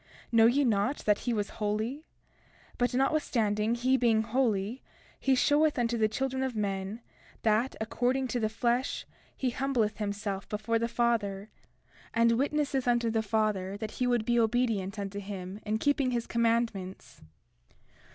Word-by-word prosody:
31:7 - - -31 0.2
Know 225 -1 +6
ye 275 +5 +3
not 230 +4 +1
that 210 -1 +3
he 245 - -2
was 205 -3 -1
holy? 220 +8 -2 0.7
But 245 0 +1
notwithstanding 235 -6 +1
he 255 +2 +2
being 225 -3 +3
holy, 225 -1 0 0.4
he 270 -1 +3
showeth 295 +3 +3
unto 240 -1 +1
the 220 -2 +3
children 265 +4 -2
of 260 -3 -2
men 200 +1 -3 0.4
that, 220 +4 +2
according 250 +4 0
to 245 - -1
the 215 -2 0
flesh 240 +3 -1 0.3
he 255 -2 0
humbleth 245 -5 0
himself 200 -1 -3
before 215 +2 -1
the 230 - 0
Father, 215 -4 -1 0.6
and 230 0 +4
witnesseth 275 +1 0
unto 240 -1 +2
the 225 0 +1
Father 210 -3 -1
that 215 0 -5
he 250 - +3
would 240 -3 +1
be 240 0 +2
obedient 220 -4 +1
unto 200 0 -4
him 195 -1 -6
in 215 +1 +1
keeping 285 +2 +1
his 240 -2 -1
commandments. 230 -5 -1
230 Hz, 155 wpm, -29 LUFS, 210-250 Hz, 0.7 s, Know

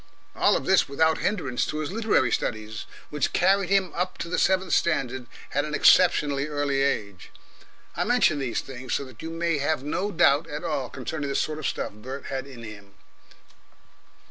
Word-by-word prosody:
All - - +4
of - - -6
this - - +3
without 160 +3 +2
hindrance 140 - -1
to 150 - -3
his 155 +1 -3
literary 215 - +2
studies, 110 -2 -3 0.2
which 150 -1 -1
carried 190 +1 +3
him 195 -2 +2
up 180 +1 -2
to 170 - -5
the 180 - 0
seventh 190 -2 +2
standard 130 -6 0 0.3
at - - +1
an - - -3
exceptionally 145 -1 +4
early 145 -2 0
age. 100 -9 -2 0.7
I - - 0
mention 240 -11 +3
these 130 -4 -2
things 130 -1 -5
so 140 - -2
that 130 -4 -13
you 165 - -5
may 165 -2 -1
have 145 -1 0
no 180 +7 -1
doubt 165 -3 +3
at 150 +2 -5
all 145 -7 -2
concerning 140 +2 -4
the 140 - -2
sort 155 0 -1
of 155 - -2
stuff - - -3
Bert 130 +6 -8
had 135 0 -4
in 125 -4 -11
him. 100 -2 -11
145 Hz, 185 wpm, -26 LUFS, 130-170 Hz, 0.7 s, All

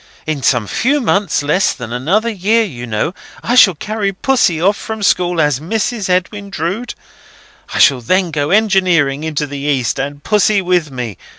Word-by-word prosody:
In 155 -3 -3
some 125 -4 +2
few 270 - 0
months 200 - 0
less 180 +8 +1
than 120 -3 -8
another 175 - 0
year, 215 +3 +1
you 125 - -7
know, 110 +10 -2 0.3
I 240 - -1
shall 205 -8 +6
carry 210 +4 -2
Pussy 195 -5 +1
off 195 +5 +2
from 220 -1 -6
school 180 -3 +1
as 150 -4 +2
Mrs. 210 +4 -2
Edwin 200 +3 -1
Drood. 195 +8 -4 0.8
I - - 0
shall 135 -5 +4
then 185 +8 +1
go 145 -1 -1
engineering 185 -9 +2
into 155 -2 -2
the 145 -1 -7
East, 140 -4 -1
and 145 +1 -5
Pussy 210 -1 +2
with 180 -4 0
me. 120 -8 -6
175 Hz, 175 wpm, -15 LUFS, 145-205 Hz, 0.8 s, shall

